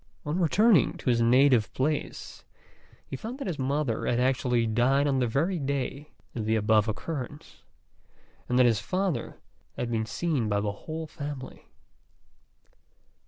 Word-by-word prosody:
On 150 +5 -1
returning 190 - +4
to 125 - 0
his 115 -1 +2
native 125 -1 +4
place 145 +3 -3 0.6
he - - -6
found 225 - -6
that 280 - -6
his 175 -7 -3
mother 135 -2 -1
had 120 - +1
actually 125 -2 +1
died 125 +5 +2
on 135 -2 +1
the 125 - +1
very 165 +10 0
day 140 +1 -3 0.2
of 110 -3 -4
the 110 +1 +2
above 110 0 +3
occurrence, 145 +5 -6 0.9
and 125 - +2
that 125 - +6
his 115 -3 +3
father 185 -9 -2 0.4
had 120 -1 -3
been 110 -1 -1
seen 130 0 -1
by 100 -1 +1
the 100 0 -1
whole 160 +10 -6
family. 145 -3 -8
130 Hz, 150 wpm, -27 LUFS, 115-150 Hz, 0.9 s, that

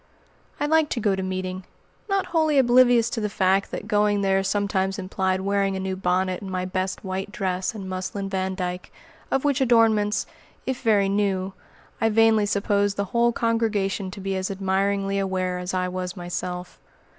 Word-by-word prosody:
I - - +1
liked 315 0 +2
to 240 - -3
go 205 -3 +2
to 190 - -3
meeting, 185 0 -4 0.5
not 390 -1 +1
wholly 315 -3 +3
oblivious 245 -2 +5
to 225 - -2
the 210 - -1
fact 190 0 +1
that 210 - -6
going 210 -2 +2
there 195 0 +2
sometimes 195 -1 0
implied 190 0 -1
wearing 195 0 0
a - - -3
new 190 0 -2
bonnet 185 0 0
and 195 - -7
my 185 -1 -2
best 185 +1 -3
white 190 +1 -4
dress 190 0 -2
and 195 -3 -6
muslin 185 +2 -4
"vandyke," 185 -2 -3 0.4
of 270 +1 0
which 280 -2 +2
adornments, 225 -4 +3 0.4
if 260 -1 -3
very 210 -4 +3
new, 195 -1 0 0.5
I 225 - +3
vainly 220 -1 +4
supposed 200 0 +1
the 200 - 0
whole 235 0 +4
congregation 215 -5 0
to 190 - -9
be 195 0 -2
as 190 0 -2
admiringly 195 +1 0
aware 185 -2 -1
as 180 +1 -4
I 185 -1 0
was 180 0 -4
myself. 180 0 -5
195 Hz, 175 wpm, -24 LUFS, 185-215 Hz, 0.5 s, oblivious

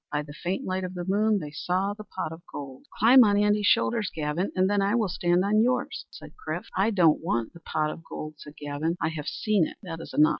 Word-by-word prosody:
By 150 0 -1
the 145 0 -10
faint 175 +5 -3
light 185 0 -2
of 185 0 -5
the 175 -1 -4
moon 210 +3 +2
they 150 -6 -5
saw 185 +6 -1
the 215 +1 -9
pot 160 - -5
of 160 +1 -9
gold. 135 -2 -8
"Climb 245 +4 +8
on 205 -2 +3
Andy's 210 0 +3
shoulders, 230 -4 +2
Gavin, 155 +4 -2
and 185 0 +3
then 205 0 +2
I 200 +3 +2
will 225 -3 +2
stand 175 +1 +1
on 215 +2 +3
yours," 255 - 0
said - - -12
Chrif. - - -4
"I 195 +4 +3
don't 175 -8 +4
want 120 -7 -1
the 170 - -13
pot 155 -1 -1
of 165 - -10
gold," 155 -1 -7
said 145 0 -12
Gavin. 150 +4 -2
"I - - 0
have 155 -2 -6
seen 210 -5 +1
it; - - -11
that 165 -3 -6
is - - -9
enough. 305 +2 +6
185 Hz, 250 wpm, -27 LUFS, 155-205 Hz, -, Climb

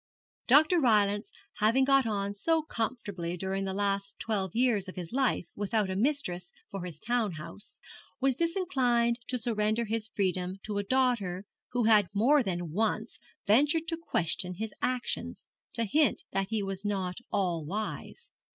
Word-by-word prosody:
Dr. 310 +7 +6
Rylance 210 -5 +2 0.3
having 230 +6 +3
got 275 -2 +4
on 200 -2 -1
so 320 +10 +1
comfortably 205 - -3
during 195 +2 -2
the 190 - -2
last 200 0 -1
twelve 195 -4 -2
years 230 -5 +2
of 185 - -8
his 175 -2 -6
life 265 -8 +1
without 205 -1 0
a - - -2
mistress 195 -7 0 0.2
for 195 -2 -5
his 170 -4 -7
town 230 -4 0
house, 160 +6 -9 0.4
was 265 -1 +2
disinclined 260 -9 +1
to 255 - -1
surrender 220 0 0
his 220 0 -2
freedom 185 -1 -1
to 210 -1 -2
a - - -1
daughter 210 -6 +1 0.3
who 245 -1 +1
had 215 -4 +5
more 270 +8 +5
than 175 -6 -3
once 220 +4 -1 0.3
ventured 295 +9 +3
to 330 - 0
question 180 - -1
his 220 +3 -5
actions, 250 -1 -2 0.3
to 230 - 0
hint 290 +4 +2
that 195 0 -1
he 220 -2 -1
was 195 0 -4
not 190 -3 -2
all 175 -5 0
wise. 215 - -5
215 Hz, 160 wpm, -30 LUFS, 195-250 Hz, 0.4 s, Dr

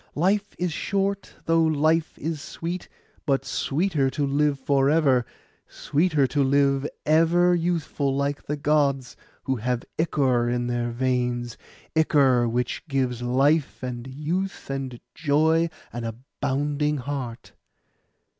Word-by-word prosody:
Life 200 +5 +1
is 175 -2 -1
short, 200 +2 -1
though 165 0 +3
life 160 +1 +2
is 155 0 -3
sweet: 170 +4 -5 0.4
but 135 -2 +1
sweeter 150 -2 0
to 140 +2 -1
live 140 0 +1
for 135 0 +2
ever; 140 -6 +3 0.4
sweeter 155 -2 +1
to 140 +2 +1
live 140 +1 +2 0.2
ever 165 +3 +4
youthful 165 -5 0
like 140 +1 -2
the 150 - -2
Gods, 140 -3 +1 0.3
who 130 -1 -1
have 120 +2 -1 0.2
ichor 130 -7 +2
in 120 0 -1
their 120 0 -1
veins—ichor 125 +2 0
which 125 +1 -1
gives 130 -3 0
life, 135 +5 +1
and 125 -1 -5
youth, 155 +5 -3
and 135 -3 -4
joy, 160 +2 +2 0.2
and 120 0 -4
a 115 -1 -4 0.3
bounding 145 +2 0
heart. 125 -3 -5
140 Hz, 125 wpm, -25 LUFS, 130-160 Hz, 0.4 s, ever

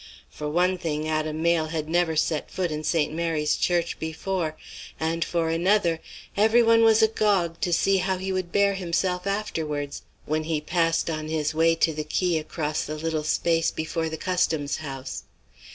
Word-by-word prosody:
For 150 0 -5
one 180 +3 +1
thing, 155 -2 -2
Adam 155 0 -1
Mayle 170 -2 +2
had 155 -1 -3
never 165 0 +1
set 155 0 0
foot 180 -3 -2
in 155 0 -3
St. 155 -1 +1
Mary's 160 -2 0
Church 175 -1 0
before, 160 0 -3 0.4
and 165 +1 0
for 165 -2 -1
another, 170 0 +2 0.4
every 220 +3 +5
one 230 0 +5
was 225 0 +5
agog 200 -6 +2
to 175 - 0
see 195 +3 +3
how 190 0 0
he 190 +1 -3
would 185 -2 -3
bear 200 +1 +3
himself 180 0 -1
afterwards, 155 -8 -3 0.2
when 155 +1 -1
he 160 -1 0
passed 165 +2 +1
on 155 -2 -3
his 155 -1 -1
way 165 +1 +3
to 165 0 +2
the 155 0 -3
quay 170 +2 0
across 155 -1 -3
the 155 - -5
little 160 0 -2
space 165 +1 +1
before 160 +1 -3
the 160 - -5
Customs 160 -5 0
House. 135 -3 -6
165 Hz, 175 wpm, -25 LUFS, 155-180 Hz, 0.4 s, every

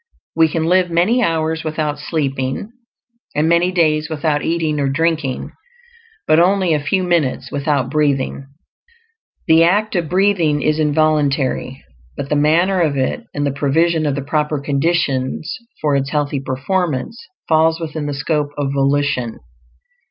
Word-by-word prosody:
We 160 -1 +4
can 160 0 -1
live 180 +1 +3
many 180 +9 +2
hours 160 -4 0
without 155 -2 -2
sleeping, 140 - -3 0.6
and 150 +2 +2
many 170 +2 +3
days 160 -3 +1
without 150 -1 -1
eating 160 -3 -1
or 140 -1 +1
drinking, 155 -2 -1 0.7
but 155 - +4
only 185 -1 +3
a 150 - +1
few 185 +6 0
minutes 170 -7 0
without 140 -2 -1
breathing. 140 -2 0 1.0
The 160 +1 +5
act 205 +5 +2
of 170 -4 -1
breathing 180 -6 +2
is 155 0 +1
involuntary, 145 -3 0 0.3
but 140 - -5
the - - +1
manner 170 +6 +2
of 150 -4 +1
it, 135 - -1
and 145 0 -1
the 140 - 0
provision 155 +3 +1
of 140 - 0
the 140 - -3
proper 150 +1 -1
conditions 140 -1 -1 0.2
for 150 -2 +1
its 135 0 -1
healthy 145 -1 -1
performance, 140 - -2 0.2
falls 160 +1 +3
within 155 -2 -4
the 145 - -3
scope 150 +1 -1
of 140 -2 -1
volition. 140 -3 0
155 Hz, 145 wpm, -18 LUFS, 140-165 Hz, 1.0 s, The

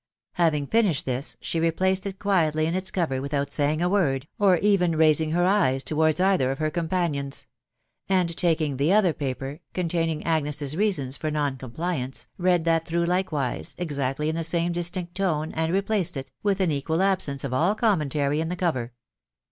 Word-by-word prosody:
Having 160 -5 +1
finished 205 -4 +1
this, 130 +2 -4
she 165 - -2
replaced 185 +4 +1
it 195 -1 -6
quietly 160 -7 +1
in 165 - -1
its 185 +1 -1
cover 155 -8 -1
without 140 0 -2
saying 150 +3 +1
a - - +2
word, 145 -9 +1
or 195 -3 +5
even 180 -3 +2
raising 155 0 +4
her 175 +2 +2
eyes 140 -10 +2
towards 155 +1 +1
either 185 -8 +3
of 135 - -2
her 155 0 -1
companions; 160 -5 -1 0.6
and 180 -3 +2
taking 155 -5 +1
the 145 +6 +2
other 195 -5 +4
paper, 135 +1 -4 0.2
containing 165 -3 -1
Agnes 150 -3 0
s 145 -1 -1
reasons 155 -9 0
for 155 - -3
non 145 -3 -1
compli 155 +8 -4
ance, 125 -2 -8
read 175 -2 +2
that 165 -1 +1
through 170 +1 0
likewise, 150 - -1
exactly 145 -3 -2
in 160 - -1
the 165 - -2
same 170 +1 +1
distinct 175 0 -1
tone, 160 -5 -1
and 160 0 -1
replaced 195 -3 0
it, 135 - -7
with 200 -1 0
an 180 -4 +2
equal 160 +5 0
absence 185 -8 0
of 135 -2 -3
all 170 +11 +2
commentary, 150 - +1
in 160 - -2
the 180 - -2
cover. 130 -10 -2
160 Hz, 185 wpm, -25 LUFS, 145-180 Hz, 0.6 s, or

